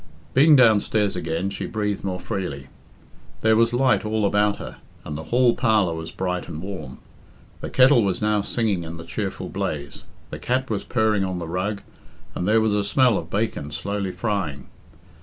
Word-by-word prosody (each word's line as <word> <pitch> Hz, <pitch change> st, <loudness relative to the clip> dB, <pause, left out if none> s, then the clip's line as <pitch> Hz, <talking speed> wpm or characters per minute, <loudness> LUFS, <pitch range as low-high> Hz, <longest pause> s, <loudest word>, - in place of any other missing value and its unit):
Being 150 Hz, +3 st, +6 dB
downstairs 110 Hz, -4 st, +4 dB
again, 85 Hz, +2 st, -2 dB
she -, -, -4 dB
breathed 105 Hz, -2 st, -2 dB
more 95 Hz, -2 st, -3 dB
freely. 70 Hz, -8 st, -5 dB, 0.7 s
There 110 Hz, 0 st, +4 dB
was 115 Hz, +1 st, +3 dB
light 130 Hz, +1 st, +2 dB
all 110 Hz, 0 st, 0 dB
about 105 Hz, +1 st, +2 dB
her, -, -, -8 dB, 0.3 s
and 75 Hz, -, -5 dB
the 80 Hz, +1 st, -6 dB
hall 120 Hz, +5 st, +3 dB
parlour 110 Hz, -8 st, +2 dB
was 80 Hz, 0 st, -6 dB
bright 90 Hz, -1 st, -3 dB
and 80 Hz, -3 st, -6 dB
warm. 85 Hz, -8 st, -7 dB, 0.6 s
The -, -, -5 dB
kettle 130 Hz, -2 st, +5 dB
was 95 Hz, -2 st, 0 dB
now 105 Hz, -1 st, +1 dB
singing 105 Hz, -5 st, -1 dB
in 85 Hz, 0 st, -7 dB
the 85 Hz, -, -8 dB
cheerful -, -, -4 dB
blaze, 70 Hz, -2 st, -4 dB, 0.3 s
the -, -, -6 dB
cat 130 Hz, 0 st, -1 dB
was 105 Hz, -, -1 dB
purring 110 Hz, -4 st, +1 dB
on 95 Hz, -1 st, -2 dB
the 85 Hz, -2 st, -5 dB
rug, 95 Hz, +4 st, -3 dB, 0.5 s
and 90 Hz, -, -3 dB
there 110 Hz, +2 st, +4 dB
was 110 Hz, -1 st, +1 dB
a 105 Hz, -1 st, +1 dB
smell 125 Hz, +2 st, +3 dB
of 80 Hz, -, -9 dB
bacon 100 Hz, -7 st, -2 dB
slowly 100 Hz, +4 st, -3 dB
frying. 90 Hz, -, -3 dB
100 Hz, 180 wpm, -23 LUFS, 90-110 Hz, 0.7 s, Being